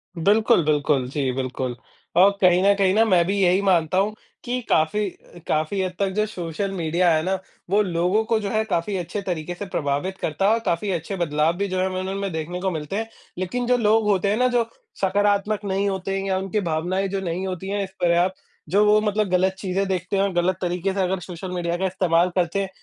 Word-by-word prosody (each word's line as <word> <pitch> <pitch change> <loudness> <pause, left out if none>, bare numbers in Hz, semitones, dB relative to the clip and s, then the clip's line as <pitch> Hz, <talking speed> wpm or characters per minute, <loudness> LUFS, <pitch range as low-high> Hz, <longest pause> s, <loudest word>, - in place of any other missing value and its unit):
बिल्कुल, 210 +3 +3
बिल्कुल। 145 -3 +1
जी, 135 -1 -1
बिल्कुल। 130 -1 -3 0.4
और 190 +3 +7
कहीं 180 -1 +5
न 200 - +6
कहीं 195 -2 +2
ना 220 +2 +5
मैं 180 -5 +4
भी 195 +3 -1
यही 185 +1 +3
मानता 180 -3 +2
हूँ 205 +3 +2 0.3
कि 250 +1 -2
काफ़ी 180 +7 +2 0.4
काफ़ी 155 +6 0
हद 185 -1 -1
तक 200 -1 +1
जो 215 +2 +1
सोशल 190 -1 -4
मीडिया 175 -1 +1
है 155 - +2
ना 190 +2 0 0.3
वो 205 +3 +4
लोगों 180 +3 +1
को 225 -1 +1
जो 205 -2 -3
है 215 +2 +1
काफ़ी 195 -1 -1
अच्छे 180 +3 -4
तरीके 175 -3 -3
से 200 - -6
प्रभावित 150 +2 -2
करता 160 +3 -1
है - - +5
और 230 - +1
काफ़ी 185 +4 0
अच्छे 175 +2 -3
बदलाव 155 -1 +1
भी 200 +1 -1
जो 185 -1 -2
हैं 185 - +2
हमें 185 0 -3
उनमें 195 +1 -3
देखने 165 +3 -4
को 190 - 0
मिलते 155 +2 -4
हैं। 225 +2 -2 0.3
लेकिन 185 +7 -2
जो 250 0 +4
लोग 220 -1 +3
होते 200 -1 +2
हैं 210 - +1
ना 250 +1 +3
जो 245 -1 +2 0.4
सकारात्मक 205 +2 +1
नहीं 200 +1 0
होते 195 0 -3
हैं 195 - -3
या 190 -1 +1
उनकी 195 +2 -1
भावनाएँ 180 +5 0
जो 195 0 -2
नहीं 180 +1 -3
होती 185 +1 -5
हैं 200 0 -1
इस 190 - -7
पर्याप्त 175 +2 +2 0.3
जो 200 +5 +4
वो 210 0 +5
मतलब 210 -1 0
गलत 185 +1 +2
चीज़ें 195 0 -1
देखते 185 0 -2
हैं 195 - +3
और 200 -1 -1
गलत 175 +1 +1
तरीके 180 +1 -1
से 195 - -1
अगर 190 0 0
सोशल 180 +1 -7
मीडिया 175 -1 -2
का 190 - -1
इस्तेमाल 180 -2 +2
करते 180 +1 +1
हैं, 195 - -3
190 Hz, 230 wpm, -23 LUFS, 175-200 Hz, 0.4 s, और